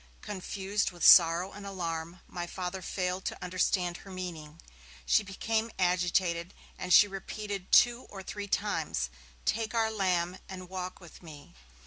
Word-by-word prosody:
Confused 200 Hz, +1 st, -2 dB
with 175 Hz, -1 st, -3 dB
sorrow 175 Hz, +2 st, +7 dB
and 205 Hz, -, -10 dB
alarm, 170 Hz, -3 st, -4 dB
my 175 Hz, -1 st, -5 dB
Father 185 Hz, +1 st, -4 dB
failed 185 Hz, 0 st, -2 dB
to -, -, -3 dB
understand 180 Hz, -1 st, 0 dB
her 195 Hz, -, -13 dB
meaning. 165 Hz, -4 st, -7 dB, 0.5 s
She -, -, +4 dB
became 220 Hz, +3 st, -2 dB
agitated, 180 Hz, -1 st, +1 dB, 0.2 s
and 180 Hz, -, -5 dB
she 205 Hz, -, +8 dB
repeated 200 Hz, 0 st, -6 dB
two 240 Hz, +1 st, +5 dB
or 195 Hz, -1 st, -8 dB
three 205 Hz, +2 st, -6 dB
times: 165 Hz, -, -1 dB, 0.3 s
'Take 225 Hz, +1 st, -1 dB
our 225 Hz, -1 st, +2 dB
lamb, 185 Hz, -3 st, 0 dB
and 185 Hz, -2 st, -8 dB
walk 185 Hz, -1 st, -5 dB
with 175 Hz, -3 st, -14 dB
me!' 150 Hz, -4 st, -12 dB
185 Hz, 145 wpm, -30 LUFS, 175-200 Hz, 0.5 s, she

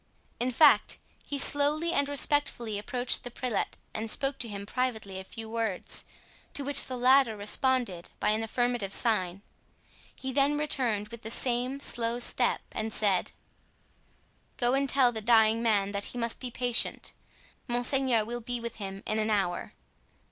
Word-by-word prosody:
In 245 Hz, +2 st, 0 dB
fact, 255 Hz, -4 st, +4 dB, 0.3 s
he 285 Hz, -, -4 dB
slowly 295 Hz, +4 st, +4 dB
and 285 Hz, 0 st, 0 dB
respectfully 280 Hz, -7 st, +1 dB
approached 245 Hz, +4 st, 0 dB
the 245 Hz, -, -6 dB
prelate 245 Hz, -3 st, -3 dB, 0.2 s
and 220 Hz, +1 st, -4 dB
spoke 270 Hz, +4 st, +1 dB
to 240 Hz, -, 0 dB
him 200 Hz, -2 st, -7 dB
privately 220 Hz, -5 st, -3 dB
a -, -, -8 dB
few 225 Hz, +3 st, -9 dB
words, 225 Hz, -4 st, -1 dB, 0.5 s
to 285 Hz, -, 0 dB
which 285 Hz, +1 st, +4 dB
the 255 Hz, -, -5 dB
latter 250 Hz, -2 st, +4 dB
responded 210 Hz, -3 st, 0 dB
by -, -, +1 dB
an 215 Hz, +1 st, 0 dB
affirmative 235 Hz, -3 st, -2 dB
sign. 195 Hz, -5 st, 0 dB, 0.7 s
He 265 Hz, 0 st, -6 dB
then 285 Hz, +2 st, +2 dB
returned 245 Hz, -8 st, 0 dB
with 235 Hz, 0 st, -10 dB
the 220 Hz, -, -6 dB
same 250 Hz, +3 st, -1 dB
slow 235 Hz, -3 st, 0 dB
step 245 Hz, -, +1 dB
and 220 Hz, 0 st, -4 dB
said: 200 Hz, -4 st, +2 dB, 1.3 s
"Go 245 Hz, 0 st, +2 dB
and 275 Hz, 0 st, +1 dB
tell 260 Hz, -2 st, +4 dB
the 220 Hz, -2 st, -4 dB
dying 220 Hz, 0 st, +4 dB
man 205 Hz, -4 st, +1 dB
that 200 Hz, 0 st, -2 dB
he -, -, -5 dB
must 230 Hz, -1 st, -2 dB
be 255 Hz, -, -5 dB
patient. 245 Hz, -1 st, -2 dB, 0.5 s
Monseigneur 245 Hz, -1 st, +2 dB
will 240 Hz, +2 st, -5 dB
be 245 Hz, +1 st, -4 dB
with 235 Hz, 0 st, -7 dB
him 195 Hz, -1 st, -7 dB
in 215 Hz, -, -1 dB
an 215 Hz, 0 st, 0 dB
hour." 195 Hz, -4 st, -1 dB
235 Hz, 160 wpm, -28 LUFS, 215-260 Hz, 1.3 s, fact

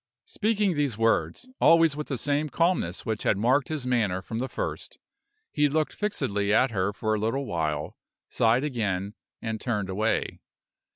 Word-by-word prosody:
Speaking 210 Hz, -3 st, 0 dB
these 145 Hz, -7 st, 0 dB
words, 115 Hz, -, +1 dB
always 165 Hz, -3 st, +5 dB
with 150 Hz, 0 st, -5 dB
the 135 Hz, -, -2 dB
same 145 Hz, +4 st, -1 dB
calmness 165 Hz, -, 0 dB
which 110 Hz, -1 st, -2 dB
had 100 Hz, -, +2 dB
marked 125 Hz, +6 st, +2 dB
his 155 Hz, -5 st, -4 dB
manner 105 Hz, -7 st, 0 dB
from 110 Hz, +3 st, -4 dB
the 130 Hz, +2 st, -2 dB
first, -, -, -5 dB, 0.5 s
he 150 Hz, -1 st, +2 dB
looked 155 Hz, +1 st, 0 dB
fixedly 105 Hz, -, -1 dB
at 125 Hz, +4 st, +4 dB
her 100 Hz, -2 st, 0 dB
for 110 Hz, +1 st, -2 dB
a 110 Hz, -, 0 dB
little 115 Hz, +6 st, -1 dB
while, 75 Hz, -, -2 dB, 0.3 s
sighed 115 Hz, +4 st, +2 dB
again, 105 Hz, -8 st, -2 dB, 0.3 s
and 110 Hz, -1 st, -3 dB
turned 105 Hz, -6 st, -2 dB
away. 110 Hz, +4 st, -1 dB
115 Hz, 165 wpm, -27 LUFS, 105-145 Hz, 0.5 s, always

